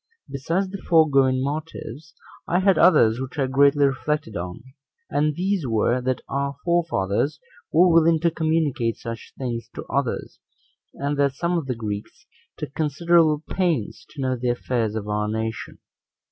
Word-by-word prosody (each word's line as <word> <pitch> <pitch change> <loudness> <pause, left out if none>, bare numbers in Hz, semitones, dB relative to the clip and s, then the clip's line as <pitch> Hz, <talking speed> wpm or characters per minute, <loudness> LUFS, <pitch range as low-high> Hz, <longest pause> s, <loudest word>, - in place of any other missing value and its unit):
Besides 165 +8 -2
the 195 - -6
foregoing 135 -6 +3
motives, 150 0 -6 0.3
I 175 - +1
had 190 0 +3
others 115 -9 +5
which 130 +1 -7
I 135 - +2
greatly 140 +2 +4
reflected 140 -3 -1
on; 90 +4 -5 0.5
and 150 +1 +1
these 185 -4 -1
were, 115 +2 +1
that 130 0 -1
our 140 0 -2
forefathers 155 - 0 0.3
were 175 +3 +5
willing 165 -1 +4
to 170 -1 +2
communicate 155 -8 0
such 115 -1 -7
things 120 -3 -4
to - - -6
others; 140 -3 -3 0.6
and 145 +1 -2
that 140 -1 +2
some 170 +4 -1
of 165 -5 -2
the 125 - -2
Greeks 105 -2 -6 0.3
took 135 - -6
considerable 160 0 +2
pains 170 - -1
to 145 - -8
know 130 0 0
the 125 0 -2
affairs 120 -3 -1
of 105 -2 -4
our 105 0 -1
nation. 110 +1 -4
140 Hz, 155 wpm, -23 LUFS, 120-160 Hz, 0.6 s, others